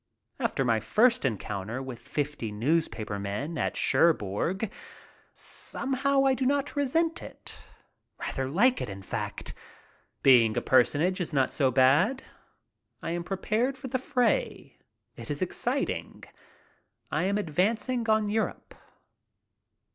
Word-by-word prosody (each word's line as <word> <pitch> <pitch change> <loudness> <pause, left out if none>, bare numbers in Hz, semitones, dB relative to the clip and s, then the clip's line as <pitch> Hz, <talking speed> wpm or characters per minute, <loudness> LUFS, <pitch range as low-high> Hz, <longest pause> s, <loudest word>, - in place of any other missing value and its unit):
After 135 - 0
my 115 -2 +2
first 225 - +3
encounter 105 -1 -3
with 130 -3 -7
fifty 145 -7 -3
news 150 +11 +1
paper 105 -2 -5
men 105 +12 -4
at - - -1
Cherbourg, 170 - +1 0.6
somehow 275 +1 0
I 265 - +4
do 260 - -2
not 280 +2 0
resent 320 +4 +1
it. - - -9 0.6
Rather 130 -1 -3
like 240 - +3
it, - - -3
in 95 0 -8
fact. - - -5 0.7
Being 120 -5 +6
a - - +2
personage 155 +8 +3
is 170 - -4
not 135 -2 +2
so 135 -3 +3
bad. 145 - +3 0.8
I 165 - -2
am 175 0 -2
pre 195 +2 -3
pared 235 +7 0
for 260 0 -7
the 260 - -1
fray. 260 - -1 0.4
It - - -8
is - - -1
exciting. - - -3 0.9
I - - 0
am 200 +2 +1
advancing 220 - 0
on 215 -1 +3
Europe. 220 +2 -2
175 Hz, 130 wpm, -28 LUFS, -, 0.9 s, Being